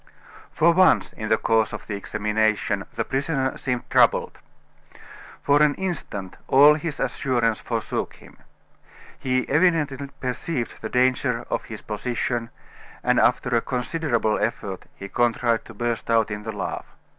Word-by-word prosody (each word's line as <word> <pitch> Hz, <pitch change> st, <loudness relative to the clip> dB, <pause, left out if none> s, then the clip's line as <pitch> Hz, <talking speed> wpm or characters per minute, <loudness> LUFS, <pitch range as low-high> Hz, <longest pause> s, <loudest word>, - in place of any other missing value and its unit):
For 170 Hz, +2 st, +4 dB
once, 185 Hz, +2 st, +4 dB
in 110 Hz, 0 st, -5 dB
the 110 Hz, -, +4 dB
course 110 Hz, -1 st, +1 dB
of -, -, -6 dB
the 105 Hz, -, -4 dB
examination, 105 Hz, 0 st, 0 dB
the 115 Hz, -, -2 dB
prisoner 135 Hz, -1 st, -1 dB
seemed 125 Hz, -2 st, -3 dB
troubled. -, -, +3 dB, 1.0 s
For 145 Hz, +1 st, +4 dB
an 150 Hz, -1 st, +4 dB
instant 145 Hz, -, -5 dB
all 145 Hz, +3 st, +7 dB
his 155 Hz, 0 st, -4 dB
assurance 120 Hz, -3 st, 0 dB
forsook 115 Hz, -2 st, -3 dB
him. -, -, -17 dB, 0.8 s
He 130 Hz, -1 st, 0 dB
evidently 150 Hz, -3 st, +1 dB
perceived 125 Hz, 0 st, -3 dB
the 110 Hz, -, -4 dB
danger 125 Hz, -1 st, +1 dB
of -, -, -1 dB
his 110 Hz, -2 st, -9 dB
position, 115 Hz, +1 st, -2 dB, 0.5 s
and -, -, +3 dB
after -, -, +2 dB
a 115 Hz, -, +3 dB
considerable 125 Hz, -4 st, -1 dB
effort -, -, -3 dB
he 100 Hz, -, -8 dB
contrived 120 Hz, +1 st, +1 dB
to 115 Hz, -, -12 dB
burst 120 Hz, +1 st, -2 dB
out 115 Hz, -2 st, +3 dB
in 105 Hz, +1 st, -6 dB
a -, -, -1 dB
laugh. 105 Hz, -, -4 dB
120 Hz, 145 wpm, -24 LUFS, 110-140 Hz, 1.0 s, all